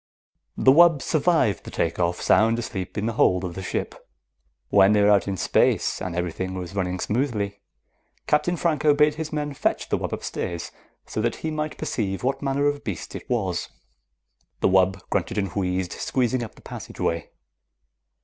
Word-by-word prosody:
The 130 Hz, -, +6 dB
wub 165 Hz, +1 st, +6 dB
survived 155 Hz, -, +2 dB
the -, -, -8 dB
take 85 Hz, -, -1 dB
off, 85 Hz, 0 st, 0 dB
sound 115 Hz, +1 st, +3 dB
asleep 100 Hz, -5 st, -5 dB
in 105 Hz, -, -1 dB
the 115 Hz, -, -1 dB
hold 90 Hz, -3 st, +3 dB
of 90 Hz, -2 st, -4 dB
the 95 Hz, -, -6 dB
ship. 95 Hz, -, -5 dB, 0.6 s
When 100 Hz, +1 st, +6 dB
they 105 Hz, -, +4 dB
were 105 Hz, -, +5 dB
out 100 Hz, -1 st, +3 dB
in 95 Hz, -1 st, -2 dB
space -, -, +2 dB
and 90 Hz, -2 st, -4 dB
everything 90 Hz, +1 st, -3 dB
was 90 Hz, 0 st, -6 dB
running 90 Hz, -2 st, -2 dB
smoothly, 105 Hz, -4 st, -1 dB, 0.7 s
Captain 150 Hz, +4 st, +1 dB
Franco 155 Hz, -3 st, +2 dB
bade 150 Hz, 0 st, +4 dB
his 155 Hz, 0 st, -5 dB
men 150 Hz, -1 st, -2 dB
fetch -, -, -1 dB
the -, -, +1 dB
wub -, -, -3 dB
upstairs 85 Hz, -2 st, -4 dB, 0.3 s
so 110 Hz, -, -3 dB
that 115 Hz, 0 st, 0 dB
he 160 Hz, -, -1 dB
might 155 Hz, 0 st, -3 dB
perceive 95 Hz, -3 st, -2 dB
what 135 Hz, +2 st, 0 dB
manner 140 Hz, 0 st, 0 dB
of 145 Hz, 0 st, 0 dB
beast -, -, -5 dB
it -, -, -8 dB
was. 95 Hz, -8 st, -1 dB, 0.9 s
The -, -, +4 dB
wub 95 Hz, 0 st, +2 dB
grunted 100 Hz, +3 st, -1 dB
and 100 Hz, -2 st, 0 dB
wheezed, 90 Hz, -2 st, -1 dB
squeezing 125 Hz, -1 st, 0 dB
up 110 Hz, -, -8 dB
the -, -, -18 dB
passageway. 85 Hz, -1 st, -4 dB
105 Hz, 180 wpm, -24 LUFS, 95-145 Hz, 0.9 s, The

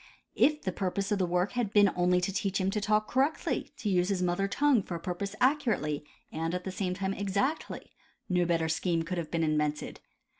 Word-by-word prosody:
If 300 Hz, +1 st, +3 dB
the 185 Hz, -, -1 dB
purpose 195 Hz, +2 st, -2 dB
of 205 Hz, -, +1 dB
the 185 Hz, -, +1 dB
work 180 Hz, +2 st, +1 dB
had 240 Hz, -5 st, -1 dB
been 205 Hz, -2 st, +5 dB
only 180 Hz, 0 st, +3 dB
to 190 Hz, +2 st, -1 dB
teach 195 Hz, 0 st, -1 dB
him 190 Hz, 0 st, +1 dB
to 210 Hz, -, -1 dB
talk 210 Hz, 0 st, +2 dB
cor 260 Hz, -, +2 dB
rectly, 295 Hz, +4 st, -1 dB
to -, -, -4 dB
use 180 Hz, -1 st, +2 dB
his 190 Hz, -2 st, 0 dB
mother 180 Hz, +2 st, +1 dB
tongue 275 Hz, +2 st, +3 dB
for 180 Hz, -, -6 dB
a -, -, -4 dB
purpose 190 Hz, +4 st, -4 dB
accurately 230 Hz, -, +1 dB, 0.3 s
and 165 Hz, +2 st, -2 dB
at 180 Hz, -, -4 dB
the 190 Hz, -, -4 dB
same 185 Hz, -1 st, -2 dB
time 195 Hz, 0 st, -2 dB
exactly, 205 Hz, +11 st, -2 dB, 0.4 s
no 180 Hz, -1 st, +2 dB
better 165 Hz, -1 st, +1 dB
scheme 165 Hz, +1 st, 0 dB
could 175 Hz, +2 st, -3 dB
have 165 Hz, -, -5 dB
been 165 Hz, -1 st, 0 dB
in 155 Hz, -1 st, +2 dB
vented. 150 Hz, 0 st, -2 dB
185 Hz, 225 wpm, -30 LUFS, 175-205 Hz, 0.4 s, been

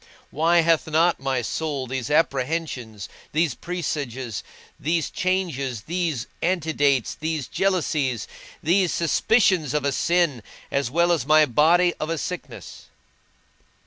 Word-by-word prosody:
Why 165 Hz, +3 st, +3 dB
hath 165 Hz, -1 st, +2 dB
not 165 Hz, +2 st, +2 dB
my 135 Hz, -2 st, -1 dB
soul 145 Hz, +1 st, -3 dB
these 130 Hz, +1 st, -4 dB
apprehensions, 135 Hz, -, -1 dB, 0.3 s
these 160 Hz, 0 st, +2 dB
presages, 140 Hz, -, -4 dB, 0.4 s
these 160 Hz, +1 st, -1 dB
changes, 165 Hz, -, -1 dB
these 165 Hz, -, -2 dB, 0.2 s
antidates, 155 Hz, -, +1 dB
these 155 Hz, -4 st, -2 dB
jealousies, 155 Hz, -, 0 dB, 0.4 s
these 180 Hz, +2 st, +3 dB
suspicions 170 Hz, -, +2 dB
of 150 Hz, -2 st, 0 dB
a 140 Hz, -, +2 dB
sin, 170 Hz, -4 st, +1 dB, 0.3 s
as 140 Hz, -3 st, 0 dB
well 170 Hz, +5 st, +2 dB
as 155 Hz, -7 st, 0 dB
my 155 Hz, 0 st, +6 dB
body 165 Hz, +7 st, +4 dB
of 155 Hz, -, -3 dB
a 165 Hz, -, -1 dB
sickness? 180 Hz, +3 st, -7 dB
155 Hz, 120 wpm, -23 LUFS, 135-170 Hz, 0.4 s, my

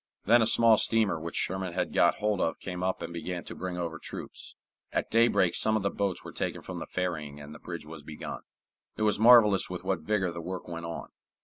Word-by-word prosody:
Then 120 Hz, +3 st, +6 dB
a 110 Hz, -, +3 dB
small 115 Hz, -1 st, +5 dB
steamer 110 Hz, -7 st, +2 dB
which 85 Hz, +1 st, -6 dB
Sherman 95 Hz, -1 st, -1 dB
had -, -, -2 dB
got -, -, +4 dB
hold 105 Hz, -2 st, 0 dB
of 80 Hz, -, -1 dB
came 90 Hz, -1 st, -5 dB
up 95 Hz, 0 st, -1 dB
and 85 Hz, -, -6 dB
began 85 Hz, +1 st, -4 dB
to -, -, -8 dB
bring 90 Hz, -1 st, -5 dB
over 85 Hz, -2 st, -4 dB
troops. -, -, -8 dB, 0.4 s
At -, -, -2 dB
daybreak 115 Hz, -6 st, +4 dB
some 110 Hz, 0 st, +2 dB
of 100 Hz, -, -3 dB
the 100 Hz, -, 0 dB
boats 100 Hz, -3 st, -2 dB
were -, -, -8 dB
taken -, -, -3 dB
from -, -, -6 dB
the -, -, -6 dB
ferrying 80 Hz, -6 st, -3 dB
and 75 Hz, +1 st, -10 dB
a -, -, -11 dB
bridge 85 Hz, -3 st, -7 dB
was 80 Hz, -1 st, -9 dB
begun. 75 Hz, +1 st, -7 dB, 0.6 s
It 110 Hz, -, -1 dB
was 105 Hz, -1 st, +2 dB
marvelous 110 Hz, -4 st, +6 dB
with 90 Hz, -1 st, -6 dB
what 95 Hz, -3 st, 0 dB
vigor 95 Hz, +1 st, 0 dB
the 85 Hz, 0 st, -6 dB
work 90 Hz, +2 st, -6 dB
went 85 Hz, -1 st, -6 dB
on. 85 Hz, -, -6 dB
90 Hz, 230 wpm, -29 LUFS, 85-105 Hz, 0.6 s, Then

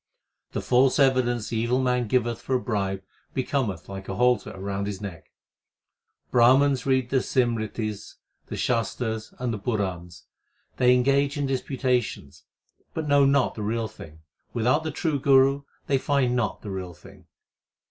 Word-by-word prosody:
The -, -, -3 dB
false 130 Hz, +1 st, +3 dB
evidence 125 Hz, -5 st, +2 dB
the 115 Hz, -, -2 dB
evil 120 Hz, +3 st, +1 dB
man 125 Hz, -2 st, +1 dB
giveth 120 Hz, 0 st, 0 dB
for 130 Hz, -, -1 dB
a -, -, +2 dB
bribe 100 Hz, -5 st, -2 dB, 0.3 s
becometh 130 Hz, -, -1 dB
like 95 Hz, 0 st, -8 dB
a 95 Hz, -, -3 dB
halter 125 Hz, +1 st, +2 dB
round 100 Hz, +1 st, -3 dB
his 100 Hz, -2 st, -4 dB
neck. 95 Hz, -6 st, -8 dB, 1.0 s
Brahmans 130 Hz, +3 st, +4 dB
read 130 Hz, -2 st, +1 dB
the 135 Hz, -1 st, +3 dB
Simritis, 110 Hz, -4 st, -2 dB, 0.3 s
the -, -, -5 dB
Shastars, 110 Hz, -1 st, -2 dB
and 125 Hz, -2 st, -2 dB
the 105 Hz, -, -4 dB
Purans: 90 Hz, -7 st, -3 dB, 0.5 s
They 125 Hz, 0 st, +5 dB
engage 140 Hz, +3 st, +2 dB
in 145 Hz, -, 0 dB
disputations, 130 Hz, -2 st, -2 dB, 0.5 s
but 160 Hz, -2 st, -3 dB
know 145 Hz, -1 st, +5 dB
not 135 Hz, -2 st, +3 dB
the 110 Hz, -, -7 dB
Real 110 Hz, +2 st, -1 dB
Thing: 80 Hz, -5 st, -13 dB, 0.3 s
Without 125 Hz, +6 st, +2 dB
the 160 Hz, -, -2 dB
true 155 Hz, -1 st, -1 dB
Guru 135 Hz, 0 st, +4 dB, 0.2 s
they 135 Hz, -1 st, +1 dB
find 130 Hz, -3 st, +1 dB
not 120 Hz, -3 st, -1 dB
the 105 Hz, -, -5 dB
Real 90 Hz, -2 st, -5 dB
Thing. 75 Hz, -, -17 dB
125 Hz, 155 wpm, -25 LUFS, 105-135 Hz, 1.0 s, They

